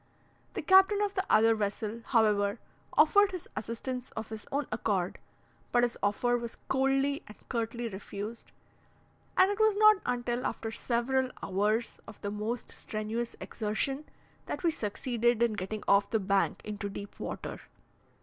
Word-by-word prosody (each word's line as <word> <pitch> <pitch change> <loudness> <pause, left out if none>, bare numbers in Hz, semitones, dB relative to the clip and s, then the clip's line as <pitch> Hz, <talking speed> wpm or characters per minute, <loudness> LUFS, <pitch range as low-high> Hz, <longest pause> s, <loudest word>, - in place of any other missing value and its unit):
The - - -3
captain 385 +2 +6
of 405 -1 -1
the 380 - 0
other 225 +1 +6
vessel, 215 +1 -2
however, 210 -3 +2 0.4
offered 405 +7 +6
his 365 -3 -7
assistance 250 +3 -4
of 220 0 -5
his 220 -1 -7
own 285 +1 0
accord 200 -4 -1 0.5
but 240 0 +4
his 240 -1 +1
offer 225 +4 +2
was 235 -1 -6
coldly 270 +1 +2
and 210 - -12
curtly 235 0 -2
refused, 205 +2 -7 0.9
and 375 +2 +6
it 410 - -3
was 435 -1 +4
not 430 0 +7
until 245 0 -1
after 225 - -4
several 255 +3 0
hours 210 +4 0
of 215 - -11
the 200 - -3
most 215 +3 -3
strenuous 220 +2 -3
exertion 255 +7 -2 0.4
that - - -4
we 335 - +4
succeeded 235 0 0
in 235 -2 +2
getting 210 +2 -4
off 200 0 +4
the 220 - +1
bank 195 0 +1
into 205 -1 -4
deep 200 0 -8
water. - - -5
230 Hz, 150 wpm, -30 LUFS, 210-265 Hz, 0.9 s, not